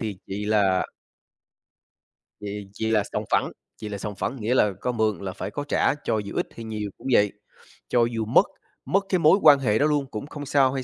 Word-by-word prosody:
thì 105 -4 -4
vậy 100 +2 -4
là 100 -4 +3 1.6
vậy 100 -1 -6
vậy 110 - +1
là 105 -2 +3
sòng - - -1
phẳng, - - +2 0.3
vậy 105 - -5
là 100 - -4
sòng 105 +1 -5
phẳng, 130 - -3
nghĩa 115 +4 0
là 105 -5 +4
có 125 - 0
mượn 110 -3 0
là 95 -1 -4
phải - - -5
có 145 - -4
trả - - +2
cho 110 - 0
dù 100 -1 -5
ít - - 0
hay 115 - -8
nhiều 105 -2 -4
cũng - - -9
vậy, 105 -3 +4 0.6
cho 120 - +3
dù 115 -2 -2
mất 125 - +5 0.4
mất 195 +1 +1
cái 185 - +2
mối 165 +5 +5
quan 145 -2 +8
hệ 110 -5 +1
đó 145 - +4
luôn 150 -2 +1
cũng 110 +6 -5
không 145 -1 -7
sao 135 -2 +3
hay 135 -1 -3
110 Hz, 225 wpm, -25 LUFS, 105-135 Hz, 1.6 s, quan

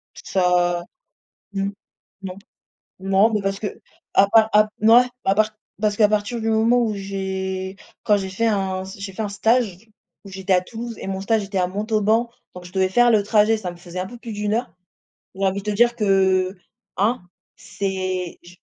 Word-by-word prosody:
Ça. 175 -2 +1 0.7
Mmh. 195 0 -1 0.5
Non. 185 -1 -5 0.6
Non, 195 +4 +3
mais, 210 - +1
parce 195 0 -1
qu'à 205 - -2 0.4
part, 215 +3 +5
à 210 0 +6
p 215 - -12
mouais. 230 +3 +7 0.2
À 195 - +3
part, 215 +1 +2 0.3
parce 210 -1 +1
qu'à 210 -2 +5
partir 215 +3 -1
du 225 - -2
moment 225 +2 +3
où 220 -2 0
j'ai, 190 -1 -4 0.3
quand 210 - +3
j'ai 190 - -4
fait 210 +5 -1
un 190 -3 0
s 190 +1 -9
j'ai 195 -1 -6
fait 220 - -3
un 210 - -2
stage 220 -2 +1 0.5
où - - -10
j'étais 190 0 -2
à 180 - +5
Toulouse 230 +4 -7
et - - -7
mon 190 0 -3
stage 220 0 +1
était 195 -1 -3
à 180 - +2
Montauban. 215 +4 +1 0.3
Donc, 180 0 -10
je 180 - -12
devais 190 -1 +2
faire 240 +4 +4
le 215 -2 +4
trajet. 215 +1 +3
Ça 185 -4 -5
me 175 - -11
faisait 175 +1 -9
un 185 - -3
peu 240 +3 -11
plus 230 -2 -8
d'1 210 0 -2
heure 235 +3 -2 0.6
où 195 +1 -2
envie 195 +1 0
de 210 - -2
te - - -3
dire 240 +2 +4
que, 190 -2 +2 0.4
hein, 215 +1 +1 0.3
c'est 185 -3 -3
je 175 +1 -15
200 Hz, 200 wpm, -22 LUFS, 190-220 Hz, 0.7 s, mouais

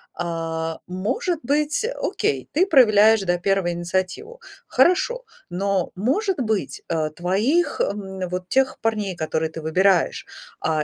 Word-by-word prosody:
А 165 -1 -3
может 295 - -2
быть, 300 - 0 0.2
окей, - - -1
ты 350 +5 +4
проявляешь, 220 - +6
да, 175 -2 0
1 190 -1 0
инициативу. 185 - -3 0.3
Хорошо, 480 +8 +2 0.2
но, 190 0 -1
может 355 - 0
быть, 210 - -2
э, 160 -2 0
твоих, 225 - +1
м, 190 -2 -3
вот 180 0 -5
тех 265 0 +1
парней, 215 -4 -1
которые 160 -1 -2
ты 160 - -7
выбираешь, 180 +3 +2 0.4
а 155 -1 0
195 Hz, 125 wpm, -22 LUFS, 175-265 Hz, 0.4 s, проявляешь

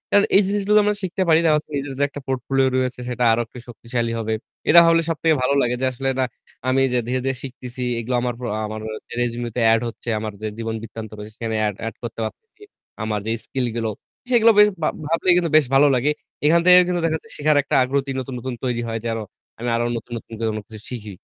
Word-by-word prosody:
আর 205 - +6
এই 195 - +8
জিনিসগুলো 205 +1 +2
আমরা 210 0 +1
শিখতে 190 +2 -2
পারি। 160 0 +6
তার 160 - +5 0.2
নিজের 140 -1 -3
যে - - +3
একটা 145 - -8
পোর্টফোলিও 135 +1 +1
রয়েছে 130 -1 -1
সেটা 125 0 -1
আরো 115 - +2
একটু 115 - -14
শক্তিশালী 115 0 -3
হবে। 110 0 -1 0.4
এটা 170 +2 +9
হলে 165 0 +5
সবথেকে 160 0 +2
ভালো 130 +2 +2
লাগে 125 0 +1
যে - - +2
আসলে 135 +2 -2
না - - +3 0.4
আমি 130 +1 +3
যে - - +2
ধীরে, 130 +1 0
ধীরে 135 0 0
শিখতেছি 125 -1 -8 0.2
এগুলো 120 +2 -2
আমার 125 0 -1 0.2
আ - - -2
আমার 110 0 -5 0.4
রেজিউমি 120 0 -2
তে - - 0
এড 115 - +2
হচ্ছে 115 - -14
আমার 110 0 -4
যে 110 - -2
জীবন 115 -1 -3
বৃত্তান্ত 115 -1 -8
রয়েছে 105 +1 -8
সেখানে 115 -1 -3
এড 105 - -3
এড 115 - -6
করতে 115 -1 -6
পারতেছি। 435 - -10 0.4
আমার 110 -1 -1
যে 110 - -1
স্কিল 130 -2 -2
গুলো 115 -1 -1 0.4
সেগুলো 230 -2 +6
বেশ 210 - +9 0.2
ভা - - +3 0.2
ভাবলেই 165 +3 +3
কিন্তু 170 -3 0
বেশ 155 - +4
ভালো 145 +2 +6
লাগে। 130 +4 +2 0.3
এখান 165 +3 +5
থেকেও 180 0 +9
কিন্তু 180 -1 0
দেখা 160 -1 +1
যাচ্ছে 225 - -18
শিখার 150 0 +3
একটা 140 - -2
আগ্রহ 135 +1 -1
নতুন, 130 0 -6
নতুন 130 +2 -4
তৈরি 120 -2 -1
হয় 115 0 -3
যেন 115 -1 -1 0.4
আমি 120 +1 -2
আরও 120 0 0
নতুন, 115 +1 -10
নতুন 115 - -11 0.2
কোন 110 - -4
কিছু 110 - -10
শিখি। 110 -4 -6
130 Hz, 225 wpm, -22 LUFS, 115-155 Hz, 0.4 s, এটা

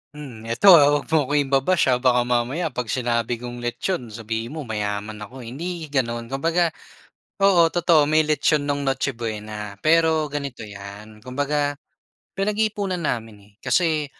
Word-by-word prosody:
Hmm, 120 -7 -9
eto, 190 +12 +6
ah, 145 - +6 0.2
huwag - - -20
mo 150 -5 +2
akong 145 0 +2
iba-bash, 135 +3 +2
ha? 125 - +2
Baka 125 -1 +3
mamaya 125 +7 -1
'pag 125 -2 -4
sinabi 120 -1 -1
kong 120 0 -6
lechon 120 +4 -3
sabihin 115 +4 -5
mo 155 - -5
mayaman 105 -1 -4
ako, 125 +5 -9
eh. 115 - -8
Hindi 170 +4 -5
gano'n, 120 -3 -2
kumbaga, 165 +4 +1 0.7
oo, 180 -4 +5
totoo, 170 -3 +4
may 155 0 +3
lechon 150 -1 +1
no'ng 145 0 -1
Noche 135 0 -1
Buena, 105 -3 -6
pero 160 -1 +3
ganito 140 -5 -5
'yan, 105 +1 -11
kumbaga, 145 +2 -1 0.6
pinag-iipunan 205 -3 -1
namin, 115 -7 -3
eh. - - -29
Kasi 160 -5 +1
135 Hz, 155 wpm, -23 LUFS, 115-160 Hz, 0.7 s, eto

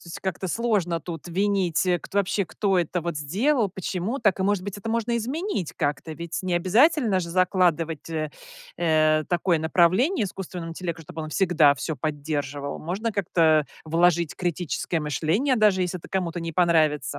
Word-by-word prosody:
То - - -17
есть 170 - -8
как-то 190 0 -3
сложно 195 -6 0
тут 170 0 -7
винить, 190 -2 +1
э, 180 -1 +2
кто 200 - -9
вообще, 200 -1 0
кто 195 0 0
это 175 +1 -1
вот 170 -2 -3
сделал, 210 - +1
почему 190 +6 -3
так, 200 -4 +2
и, - - +2
может 200 -2 +1
быть, 200 0 -5
это 225 - -6
можно 230 +1 0
изменить 265 - -3
как-то. 150 +1 -2
Ведь 170 +1 -5
не 180 -1 -1
обязательно 215 - +3
же 170 - -5
закладывать, 170 -4 +1
э, 155 -2 -2 0.5
э, 155 -2 +3
такое 175 -1 +1
направление 185 - +3
искусственному 180 -2 -6
интеллекту, 170 -1 -5
чтобы 160 +1 -8
он 155 - -6
всегда 160 -6 +4
всё 160 +4 -4
поддерживал. 145 -1 -3
Можно 200 +7 -3
как-то 160 -5 +3 0.2
вложить 170 0 +2
критическое 175 -1 -2
мышление, 160 - 0
даже 205 -4 +3
если 180 0 -3
это - - -13
кому-то 175 -3 -2
не 165 0 -4
понравится. 155 -5 +2
175 Hz, 170 wpm, -25 LUFS, 160-195 Hz, 0.5 s, всегда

